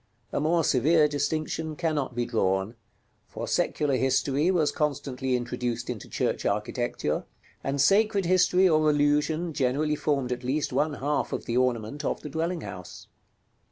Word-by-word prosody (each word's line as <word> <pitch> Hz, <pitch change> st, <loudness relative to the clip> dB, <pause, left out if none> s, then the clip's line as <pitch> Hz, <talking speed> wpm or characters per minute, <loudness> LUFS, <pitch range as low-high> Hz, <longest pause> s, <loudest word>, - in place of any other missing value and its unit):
A -, -, +1 dB
more 165 Hz, +3 st, +2 dB
severe 150 Hz, +4 st, +4 dB
distinction 155 Hz, +2 st, -2 dB
cannot 150 Hz, -6 st, -1 dB
be 120 Hz, 0 st, 0 dB
drawn: 95 Hz, -2 st, 0 dB, 0.5 s
for -, -, -6 dB
secular 140 Hz, -3 st, +1 dB
history 135 Hz, +4 st, +1 dB
was 170 Hz, -5 st, +2 dB
constantly 135 Hz, -4 st, -1 dB
introduced 120 Hz, 0 st, -3 dB
into 110 Hz, -5 st, -8 dB
church -, -, -1 dB
architecture; 105 Hz, +4 st, -1 dB, 0.4 s
and 140 Hz, +1 st, -2 dB
sacred 200 Hz, +5 st, +3 dB
history 185 Hz, +1 st, +4 dB
or 155 Hz, -2 st, +3 dB
allusion 150 Hz, +3 st, +1 dB
generally 145 Hz, +2 st, +1 dB
formed 140 Hz, -4 st, -1 dB
at 125 Hz, 0 st, -3 dB
least 140 Hz, +4 st, -1 dB
one 150 Hz, 0 st, +1 dB
half 145 Hz, +2 st, -1 dB
of -, -, -3 dB
the 120 Hz, -, -2 dB
ornament 125 Hz, +2 st, 0 dB
of -, -, -2 dB
the 150 Hz, -, -7 dB
dwelling 165 Hz, +4 st, -2 dB
house. 90 Hz, -3 st, -9 dB
145 Hz, 150 wpm, -27 LUFS, 125-155 Hz, 0.5 s, severe